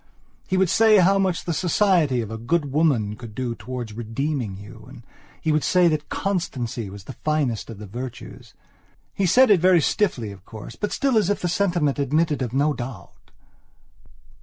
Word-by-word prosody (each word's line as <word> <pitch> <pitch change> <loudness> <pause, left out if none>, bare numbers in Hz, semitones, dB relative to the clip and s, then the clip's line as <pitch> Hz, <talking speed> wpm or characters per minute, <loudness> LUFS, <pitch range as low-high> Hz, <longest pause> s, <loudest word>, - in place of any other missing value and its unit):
He 190 - 0
would 190 -2 +2
say 220 0 +5
how 195 +1 +4
much 185 -3 0
the 170 - -2
society 170 - +2
of 110 -1 -6
a 110 - -4
good 145 +4 -1
woman 135 -9 +1
could 110 -1 -11
do 125 -2 -2
towards 120 -1 -7
redeeming 120 -1 -3
you, 100 0 -12
and - - -13 0.3
he 160 - 0
would 150 -1 +1
say 180 -1 +4
that 155 -1 -2
constancy 130 - -3
was 100 0 -10
the 130 - -9
finest 145 -9 -1
of 115 - -8
the 105 - -9
virtues. 120 +5 -9 0.6
He 195 - 0
said 255 +6 +5
it 195 - +6
very 180 -1 +5
stiffly, 135 - 0
of 95 -2 -13
course, 110 +1 -10
but 210 - -3
still 270 -5 +2
as 205 - 0
if 205 - -1
the 180 - 0
statement 175 -6 0
admitted 150 +2 +1
of 125 -3 -2
no 145 +4 +1
doubt. 120 - -9
145 Hz, 185 wpm, -23 LUFS, 115-180 Hz, 0.6 s, it